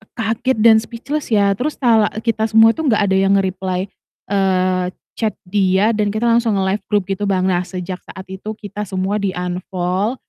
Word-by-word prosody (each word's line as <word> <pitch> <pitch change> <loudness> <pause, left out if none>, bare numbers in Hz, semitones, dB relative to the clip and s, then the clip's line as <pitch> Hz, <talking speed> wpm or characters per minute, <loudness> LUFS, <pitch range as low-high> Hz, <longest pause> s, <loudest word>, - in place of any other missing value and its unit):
kaget 230 +2 -1
dan 225 0 +7
speechless 265 +7 -5
ya, 200 -2 +4
terus 280 +9 -2
talak 225 -5 +3
eee, - - -12
kita 220 0 -1
semua 225 +1 +6
tuh 320 -2 -2
gak 210 -2 +3
ada - - +3
yang 195 +1 +3
nge-reply, 185 0 -2 0.4
eee, 185 -2 +1 0.3
chat 220 -2 0
dia 190 +2 +2
dan 210 -2 0
kita 220 - -1
langsung 230 -2 +2
nge-left 195 +1 0
grup 205 -2 +1
gitu, 200 +1 -2
Bang. 190 -2 +1
Nah, 175 - +2
sejak 185 0 -5
saat 190 - -9
itu 210 +3 -6
kita 210 -1 -7
semua 190 +3 -1
di-unfollow 185 +2 -2
200 Hz, 180 wpm, -18 LUFS, 185-220 Hz, 0.4 s, dan